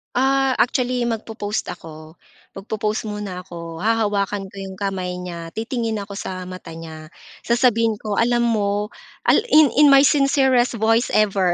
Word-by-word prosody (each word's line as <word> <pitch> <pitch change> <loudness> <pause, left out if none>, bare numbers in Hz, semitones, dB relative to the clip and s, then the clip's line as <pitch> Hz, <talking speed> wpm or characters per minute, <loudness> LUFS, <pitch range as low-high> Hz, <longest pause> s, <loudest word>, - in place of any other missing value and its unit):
Ah, 270 +1 +2
actually 245 -1 +1
magpo-pause 220 -2 -3
ako. 155 0 -12 0.3
Magpo-pause 215 +2 -3
muna 210 -3 -5
ako. 170 -2 -9
Hahawakan 205 -1 0
ko - - -17
yung 190 -1 -7
kamay 190 -2 -3
niya, 170 -2 -7
titingin 225 -2 -2
ako 200 0 -8
sa 185 -1 -5
mata 180 -2 -9
niya 160 -1 -9 0.4
sasabihin 230 -2 +2
ko, 210 -1 -3
"Alam 240 +1 +2
mo," 210 -2 0 0.3
al - - +5
in 310 - +6
in 300 - +8
my 275 -1 +7
sincerest 270 -4 +3
voice 225 +2 +2
ever 195 -4 +2
210 Hz, 145 wpm, -21 LUFS, 185-240 Hz, 0.4 s, in